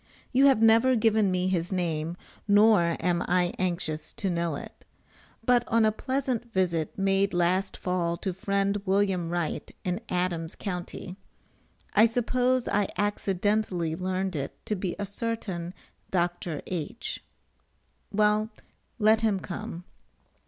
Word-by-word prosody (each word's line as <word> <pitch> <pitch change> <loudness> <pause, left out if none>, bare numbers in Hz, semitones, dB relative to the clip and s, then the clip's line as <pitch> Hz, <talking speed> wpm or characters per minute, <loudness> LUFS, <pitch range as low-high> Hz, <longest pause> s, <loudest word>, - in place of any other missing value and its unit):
You 270 +2 +5
have 260 -5 +4
never 230 +3 +6
given 220 -3 +3
me 185 0 0
his 175 -1 -1
name, 170 -2 -1 0.3
nor 205 -5 +5
am 175 -1 +1
I 180 0 +2
anxious 170 -4 -2
to 195 - -2
know 170 -3 -1
it. - - -10 0.6
But 245 -1 +4
on 230 -1 +3
a 215 - +4
pleasant 255 0 -2
visit 175 -5 0
made 195 -1 +2
last 180 +2 +1
fall 175 -2 -1
to 190 +1 -3
friend 200 +2 0
Wm. 190 -3 +1
Wright, 175 -2 -2
in 180 +4 -2
Adams 175 -2 -1
Co., 180 -4 -3 1.1
I 215 +3 +6
suppose 250 +2 +1
I 205 -1 +1
accidentally 200 -3 0
learned 185 +1 -2
it 140 -2 -4
to 210 - -1
be 185 -2 -3
a 205 - -3
certain 200 -5 -4 0.4
Dr. 175 -3 -1
H. 180 +5 -5 0.9
Well, 210 +1 +2 0.5
let 220 0 +4
him 215 -4 +2
come. 175 -1 -6
190 Hz, 130 wpm, -27 LUFS, 175-215 Hz, 1.1 s, never